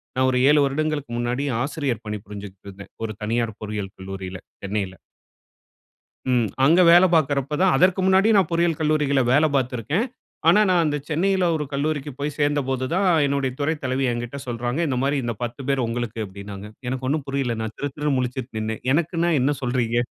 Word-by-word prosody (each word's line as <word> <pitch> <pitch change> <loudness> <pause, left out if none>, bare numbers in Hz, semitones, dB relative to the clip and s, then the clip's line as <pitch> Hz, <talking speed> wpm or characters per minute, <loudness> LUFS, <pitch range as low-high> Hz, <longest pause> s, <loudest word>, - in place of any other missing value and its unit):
நான் 130 0 +2
ஒரு 125 - +1
7 150 0 +5
வருடங்களுக்கு 145 -2 -2
முன்னாடி 120 +3 -1 0.2
ஆசிரியர் 140 -6 -2
பணி 105 -1 -4
புரிஞ்சுகிட்டு 100 -2 -9
இருந்தேன். 100 0 -11
ஒரு 110 -1 -3
தனியார் 115 0 -1
பொறியியல் 105 -2 -5
கல்லூரியில. 95 -1 -7 0.2
சென்னையில. 100 -2 -3 1.4
ம். 120 -3 +2 0.2
அங்க 170 +5 +6
வேலை 175 +2 +7
பாக்கறப்ப 145 -1 +1
தான் 190 - +4
அதற்கு 185 +1 +4
முன்னாடி 190 +3 +4
நான் 195 - +3
பொறியியல் 170 -1 +1
கல்லூரிகள்ல 150 -3 +2
வேலை 155 +3 +5
பாத்திருக்கேன். 130 - 0 0.4
ஆனா 175 +5 +7
நான் 180 -2 +4
அந்த 150 -1 0
சென்னையில 185 +4 +1
ஒரு 150 -2 -2
கல்லூரிக்கு 145 0 -2
போய் 145 +1 -2
சேர்ந்த 145 0 +2
போது 130 -1 -1
தான், 190 +1 +2 0.2
என்னுடைய 140 -2 0
துறை 145 +2 +1
தலைவி 130 +1 0
என்கிட்ட 120 +3 -4
சொல்றாங்க. 120 +4 -2
இந்த 130 -3 -1
மாரி 140 +1 +1
இந்த 120 -1 -2
10 120 +3 -5
பேர் 135 -2 +1
உங்களுக்கு 115 -1 -3
அப்டின்னாங்க. 100 +1 -9 0.2
எனக்கு 130 +1 -3
ஒண்ணும் 145 +1 -1
புரியலை. 135 -4 -1
நான் 110 0 -5
திரு 145 - -2
திருன்னு 150 -2 0
முழிச்சுட்டு 125 -1 -3
நின்னேன். 110 0 -4
எனக்குன்னா 170 +2 +1
என்ன 140 +3 +2
சொல்றீங்க? 120 -2 0
135 Hz, 175 wpm, -23 LUFS, 115-150 Hz, 1.4 s, வேலை